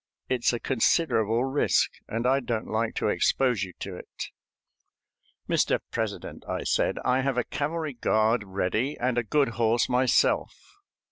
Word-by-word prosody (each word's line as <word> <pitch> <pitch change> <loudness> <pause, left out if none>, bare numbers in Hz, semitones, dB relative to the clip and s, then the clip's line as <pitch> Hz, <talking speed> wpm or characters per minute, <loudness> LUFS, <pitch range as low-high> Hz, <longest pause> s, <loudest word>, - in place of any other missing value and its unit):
It's 125 -2 +1
a 120 - -2
considerable 115 -3 +2
risk, 135 +2 +2 0.2
and 115 +2 -3
I 135 +2 +4
don't 120 -4 -3
like 110 +1 -1
to - - 0
expose 125 -6 +2
you 95 -2 -4
to 95 -2 -5
it." - - -8 1.2
"Mr. - - +2
President," - - -4
I - - -2
said, - - +1
"I 130 +1 +3
have 135 -1 -1
a 125 - +2
cavalry 150 +2 -3
guard 110 -1 +2
ready 100 +8 -1
and 125 0 +1
a - - -1
good 140 +5 +2
horse 115 +1 +3
myself. 125 0 +2
120 Hz, 150 wpm, -27 LUFS, 110-135 Hz, 1.2 s, I